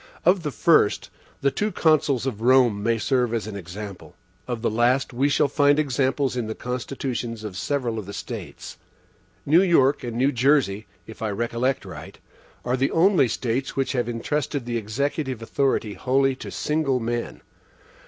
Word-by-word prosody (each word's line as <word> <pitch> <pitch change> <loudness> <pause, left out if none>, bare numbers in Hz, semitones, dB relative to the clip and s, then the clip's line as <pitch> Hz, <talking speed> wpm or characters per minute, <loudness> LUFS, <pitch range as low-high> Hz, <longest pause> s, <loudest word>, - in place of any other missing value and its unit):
Of 180 +2 +4
the 150 - -2
first, 150 -6 +2 0.3
the 140 - +2
two 210 +7 -1
Consuls 155 - +2
of 115 -5 -3
Rome 120 -4 +4
may 115 +2 +1
serve 125 0 +1
as 115 - -2
an 110 -2 -7
example; 100 +1 -8 0.3
of 120 -2 -4
the - - +2
last, 125 +4 +1
we 135 +4 +1
shall 145 +1 +3
find 145 +1 +3
examples 135 -2 0
in 120 -3 -2
the 110 - -4
constitutions 125 -2 -4
of 105 -4 -6
several 120 +1 -2
of 100 - -8
the 100 - -7
States. - - -8 0.7
New 160 +5 +5
York 155 -7 +3
and 120 -1 -4
New 135 +3 +3
Jersey, 120 -6 +2 0.2
if 110 - -12
I 110 - -1
recollect 120 +5 -1
right, - - -10 0.5
are 125 +1 +1
the 135 +1 +1
only 175 -4 +4
States 125 +3 -2
which 135 -1 0
have 120 -3 -1
intrusted 140 +3 -2
the 120 -1 -2
executive 130 +4 -2
authority 115 -2 0
wholly 135 +3 +1
to - - -8
single 150 -4 0
men. 120 0 -3
125 Hz, 170 wpm, -24 LUFS, 115-140 Hz, 0.7 s, New